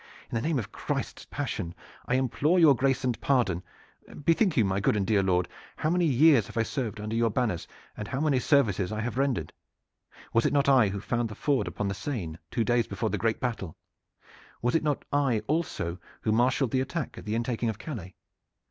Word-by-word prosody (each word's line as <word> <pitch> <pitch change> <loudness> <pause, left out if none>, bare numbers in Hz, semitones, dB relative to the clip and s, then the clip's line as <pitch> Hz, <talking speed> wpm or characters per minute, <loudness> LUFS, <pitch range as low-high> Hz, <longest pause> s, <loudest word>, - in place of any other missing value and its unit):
In - - -3
the 115 - +1
name 155 +1 0
of 115 - -4
Christ's - - -4
passion, 85 0 -3 0.3
I 125 - +2
implore 135 +6 +2
your 160 -5 +7
grace 135 +2 +1
and 125 -3 -1
pardon! 110 -11 +2 0.6
Bethink 165 +1 +3
you, 115 - +5
my 95 0 0
good 100 - +2
and 100 -2 0
dear 105 0 +3
lord, 90 -2 +1 0.3
how 155 - 0
many 175 0 +2
years 140 -4 +5
I - - -10
have 115 -1 +1
served 115 -4 -3
under 105 +2 -3
your 115 0 +3
banners 110 -6 -1 0.3
and 105 - -6
how 135 +3 -3
many 145 -4 +2
services 110 -9 +2
I 110 - -3
have 120 +3 -3
rendered. 130 - 0 0.8
Was 115 - +3
it - - -1
not 140 -1 +3
I 130 -6 +6
who 100 +1 -3
found 115 +3 -1
the 105 - -8
ford 135 -7 0
upon 100 +3 -3
the 100 - -1
Seine 95 - -4
two 115 - 0
days 120 0 +2
before 105 +2 -2
the - - -1
great 115 -1 0
battle? 110 -9 -3 0.8
Was 120 +1 0
it 165 - +3
not 150 -2 -1
I 135 -7 +2
also 135 - -2 0.2
who 110 - 0
marshaled 125 +2 +2
the 130 - +2
attack 155 +5 -3
at - - -12
the 105 +1 -1
intaking 115 0 -1
of 110 - -4
Calais? 110 - -7
120 Hz, 210 wpm, -28 LUFS, 105-140 Hz, 0.8 s, your